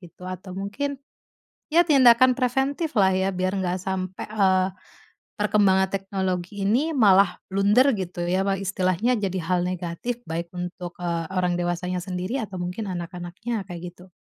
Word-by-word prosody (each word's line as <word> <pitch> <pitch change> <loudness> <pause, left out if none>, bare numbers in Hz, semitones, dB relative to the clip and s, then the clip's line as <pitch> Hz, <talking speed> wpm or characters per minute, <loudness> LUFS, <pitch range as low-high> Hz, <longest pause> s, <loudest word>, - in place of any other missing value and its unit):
gitu? 180 0 -14
Atau 185 0 -7
mungkin 275 +9 -3 0.7
ya 340 +3 +5
tindakan 255 -4 +6
preventif 270 +5 0
lah 190 -1 +4
ya 190 +1 +1
biar 185 0 -1
nggak 180 +1 -1
sampai, 185 0 -4
eee, 190 -3 +2 0.7
perkembangan 200 -2 +3
teknologi 190 0 -2
ini 285 +10 +1
malah 200 -6 +5
blunder 205 +8 +4
gitu 180 -3 -4
ya, 185 +2 +1 0.2
istilahnya 190 +4 0
jadi 190 -2 -2
hal 180 +1 +1
negatif 185 +7 -4
baik 170 +1 -4
untuk, 180 0 -6
eee, 170 -2 -2
orang 180 -1 +1
dewasanya 175 +1 -2
sendiri 185 +7 -3
atau 200 -4 -6
mungkin 180 +4 -4
anak-anaknya, 180 +5 -4
kayak 175 0 -7
gitu. 180 +1 -17
190 Hz, 145 wpm, -24 LUFS, 180-210 Hz, 0.7 s, tindakan